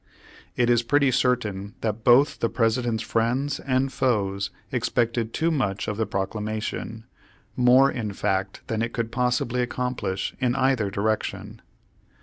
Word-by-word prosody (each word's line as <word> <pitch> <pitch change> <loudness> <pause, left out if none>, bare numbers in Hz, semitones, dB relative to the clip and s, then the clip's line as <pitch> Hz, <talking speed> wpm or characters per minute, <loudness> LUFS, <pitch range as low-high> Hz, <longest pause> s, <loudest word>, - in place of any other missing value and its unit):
It 120 -2 +2
is 120 -1 +4
pretty 140 +3 +2
certain 105 -6 0
that 110 0 -2
both 125 +5 +5
the 115 - +1
President's 115 -1 0
friends 125 +5 0
and 130 0 0
foes 100 -7 0 0.2
expected 115 -2 0
too 165 +6 0
much 110 -10 -1
of 105 - -2
the 110 0 -1
Proclamation, 110 +2 -4 0.5
more 125 +3 +5
in 110 -4 -3
fact 95 0 -2
than 110 -1 -2
it 115 0 -2
could 115 -1 -2
possibly 125 0 0
accomplish 120 -6 -2
in 125 -2 +1
either 130 -6 +2
direction. 110 +2 -2
115 Hz, 135 wpm, -25 LUFS, 110-125 Hz, 0.5 s, both